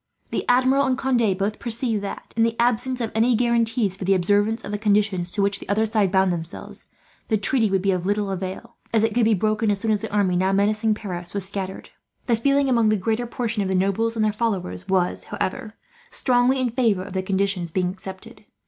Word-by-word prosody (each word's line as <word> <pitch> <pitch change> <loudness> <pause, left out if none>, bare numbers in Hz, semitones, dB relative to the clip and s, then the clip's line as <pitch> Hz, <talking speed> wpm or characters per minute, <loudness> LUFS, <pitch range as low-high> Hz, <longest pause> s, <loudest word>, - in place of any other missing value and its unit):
The - - -1
Admiral 260 +3 +4
and 255 -1 +1
Conde 240 -8 +1
both 205 +2 -2
perceived 230 -2 -1
that, 200 - -7
in 225 - +1
the 230 0 +2
absence 245 +2 +1
of 225 - -2
any 230 +2 +3
guarantees 230 -3 +1
for 195 - -7
the 195 +1 +3
observance 205 +5 +1
of 200 - -6
the 205 - -3
conditions 205 -4 +1
to 200 +2 -1
which 200 0 0
the - - -11
other 215 +2 +2
side 215 -4 +1
bound 190 -1 +3
themselves, 165 +1 -7 0.4
the 220 - +2
treaty 225 +1 +2
would 190 -1 0
be 195 - +2
of 180 -2 -1
little 205 +1 -1
avail; 190 0 -6
as 225 -1 +2
it 225 -1 +1
could 235 0 +2
be 220 -1 +4
broken, 215 +2 0
as 200 -1 +1
soon 220 +2 0
as 210 -2 +1
the 220 - -5
army 200 -3 +1
now 190 +2 +2
menacing 210 +2 +2
Paris 180 -4 -7
was 195 -2 -1
scattered. 190 -1 -5 0.3
The 235 - +2
feeling 275 +4 +2
among 235 -4 +3
the 215 - +2
great 220 +4 -1
portion 230 -3 -2
of 195 - -1
the 190 - 0
nobles 200 +5 +1
and 220 -1 +1
their 210 - +1
followers 195 -4 -3
was, 185 -2 0
however, 220 +2 -4 0.3
strongly 250 - +2
in 250 -2 0
favour 225 -6 +1
of 195 -1 -9
the 190 - 0
conditions 190 -2 -1
being 180 +2 0
accepted. 190 +5 -9
210 Hz, 225 wpm, -23 LUFS, 190-230 Hz, 0.4 s, Admiral